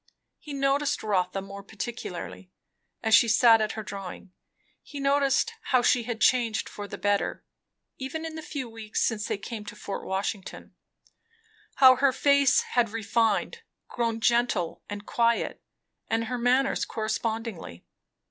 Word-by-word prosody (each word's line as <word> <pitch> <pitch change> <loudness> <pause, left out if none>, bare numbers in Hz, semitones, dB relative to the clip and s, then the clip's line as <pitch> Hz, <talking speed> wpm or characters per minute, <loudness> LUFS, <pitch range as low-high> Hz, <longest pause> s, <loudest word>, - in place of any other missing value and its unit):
He 300 - -10
noticed 280 +1 0
Rotha 190 -2 0
more 200 0 -9
particularly, 200 -4 -7 0.5
as 220 -1 +1
she 235 - +7
sat 225 0 +6
at 215 0 -1
her 220 - -5
drawing. 195 -2 -8 0.5
He 290 - -9
noticed 280 - +2
how 255 -2 +3
she 240 -1 +3
had 235 -2 -4
changed 230 -2 +2
for 205 -1 -7
the - - -7
better, 205 0 -1 0.5
even 295 +5 -4
in 320 - -5
the 320 - -6
few 290 -4 -5
weeks 225 -2 -5
since 215 -3 -1
they - - -2
came 215 +2 -7
to 210 - -8
Fort 200 -1 -6
Washington; 190 +1 -4 1.0
how 260 -2 +7
her 270 +1 +4
face 280 +1 +4
had 240 -2 0
refined, 225 - 0 0.3
grown 230 -2 -1
gentle 235 -7 +1
and 205 0 -6
quiet, 235 0 0 0.5
and 225 0 +1
her 245 +2 -3
manners 255 +3 +2
correspondingly. 220 - -4
230 Hz, 145 wpm, -27 LUFS, 205-260 Hz, 1.0 s, she